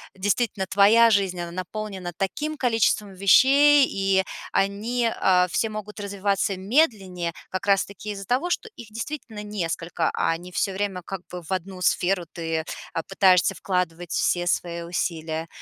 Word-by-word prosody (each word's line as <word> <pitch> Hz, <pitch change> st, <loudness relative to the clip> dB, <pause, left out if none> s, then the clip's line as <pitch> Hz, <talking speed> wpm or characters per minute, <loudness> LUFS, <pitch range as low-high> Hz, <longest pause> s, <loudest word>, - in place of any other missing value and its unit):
действительно 200 Hz, 0 st, 0 dB
твоя 220 Hz, +4 st, +6 dB
жизнь, 195 Hz, -4 st, +1 dB
она 170 Hz, 0 st, -5 dB
наполнена 185 Hz, 0 st, -5 dB
таким 300 Hz, -, -2 dB
количеством 225 Hz, -5 st, +1 dB
вещей, 275 Hz, +9 st, +6 dB
и 195 Hz, -1 st, +1 dB, 0.3 s
они, 225 Hz, +4 st, 0 dB
а, 180 Hz, -1 st, +4 dB
все 225 Hz, +6 st, 0 dB
могут 210 Hz, 0 st, -7 dB
развиваться 200 Hz, 0 st, -1 dB
медленнее 190 Hz, -, 0 dB, 0.2 s
как 185 Hz, +1 st, -4 dB
раз 200 Hz, -1 st, +4 dB
таки 205 Hz, +1 st, -8 dB
из-за 195 Hz, -1 st, -7 dB
того, 260 Hz, -, 0 dB
что 445 Hz, -, -2 dB
их 235 Hz, -2 st, -11 dB
действительно 225 Hz, -1 st, -6 dB
несколько, 170 Hz, -4 st, -2 dB
а 165 Hz, -, 0 dB
не 180 Hz, +1 st, -11 dB
все 195 Hz, +2 st, -1 dB
время 195 Hz, -2 st, -2 dB
как 190 Hz, +1 st, -7 dB
бы 180 Hz, -, -6 dB
в 165 Hz, -, -13 dB
одну 185 Hz, 0 st, -4 dB
сферу 180 Hz, 0 st, +1 dB
ты, 165 Hz, -1 st, -3 dB, 0.3 s
а, 165 Hz, -, -1 dB
пытаешься 185 Hz, -1 st, +3 dB
вкладывать 175 Hz, -2 st, -2 dB
все 175 Hz, 0 st, +1 dB
свои 170 Hz, -1 st, -1 dB
усилия. 165 Hz, -2 st, -3 dB
195 Hz, 155 wpm, -24 LUFS, 180-215 Hz, 0.3 s, твоя